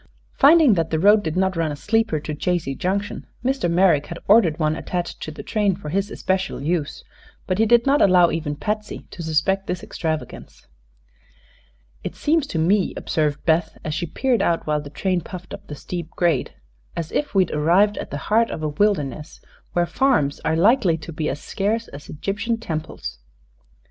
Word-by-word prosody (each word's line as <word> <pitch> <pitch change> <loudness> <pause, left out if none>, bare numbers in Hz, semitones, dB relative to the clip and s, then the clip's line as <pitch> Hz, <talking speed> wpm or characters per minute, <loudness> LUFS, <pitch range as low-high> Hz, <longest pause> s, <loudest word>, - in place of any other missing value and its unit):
Finding 295 -3 +6
that 165 -4 0
the 160 - 0
road 205 +5 +5
did 160 -2 -3
not 190 0 +1
run 165 -2 0
a - - -4
sleeper 220 -1 0
to 155 - -5
Chazy 165 -2 -1
Junction, 200 +5 -3 0.2
Mr. 265 -9 +1
Merrick 170 -4 +3
had 170 - -6
ordered 195 -7 +5
one 155 -1 +1
attached 175 +1 -4
to - - -5
the 155 - -8
train 205 -4 +1
for 180 -5 -8
his 195 +5 -1
especial 190 -1 -2
use; 155 0 -2 0.4
but 185 +1 -1
he 225 - +4
did 235 +1 +5
not 280 +2 +3
allow 180 -3 +5
even 155 -2 -2
Patsy 210 +6 -4
to 175 - -8
suspect 165 +5 0
this 180 -1 -3
extravagance. 160 -2 -5 1.4
"It - - -5
seems 305 -1 +1
to 175 - -4
me," 185 +5 +2
observed 150 -3 -1
Beth, 160 0 +1
as 155 - -2
she 170 +2 -2
peered 255 -5 0
out 170 -4 +1
while 150 -1 0
the 145 - -9
train 180 +5 -1
puffed 180 +2 -9
up - - -9
the 145 - -6
steep 170 +2 -6
grade, 170 -7 0 0.4
"as 165 -1 -4
if 290 -8 -2
we'd 185 -3 +3
arrived 175 +8 +3
at - - -6
the 145 - -4
heart 230 +2 +4
of 155 - -5
a 155 - 0
wilderness, 150 -4 -1 0.3
where 175 0 +2
farms 170 - +1
are 160 - 0
likely 195 -1 +4
to 165 +1 -9
be 155 0 -2
as - - -4
scarce 220 +7 -2
as 145 +1 -11
Egyptian 205 +8 -2
temples." 160 - -5
175 Hz, 190 wpm, -22 LUFS, 155-205 Hz, 1.4 s, Finding